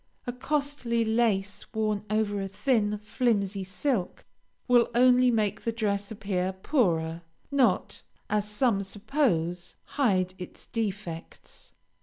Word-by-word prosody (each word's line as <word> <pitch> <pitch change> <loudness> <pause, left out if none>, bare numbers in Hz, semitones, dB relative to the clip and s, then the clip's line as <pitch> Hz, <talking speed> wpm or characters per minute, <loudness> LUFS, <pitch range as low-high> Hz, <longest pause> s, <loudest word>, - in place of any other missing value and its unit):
A 245 - -3
costly 260 -4 -1
lace 220 -4 0
worn 215 -1 0
over 210 -2 0
a 195 - -2
thin, 210 0 +1
flimsy 210 -4 0
silk, 200 +1 -2 0.4
will 245 -2 +5
only 250 0 +6
make 215 -3 0
the 230 - -1
dress 205 -3 -1
appear 195 -3 -2
poorer, 170 - 0 0.3
not, 255 -9 +2 0.3
as 210 0 0
some 210 -1 +2
suppose, 195 - -1
hide 185 -10 +1
its 180 - -8
defects. 205 -7 -6
210 Hz, 115 wpm, -28 LUFS, 195-240 Hz, 0.4 s, only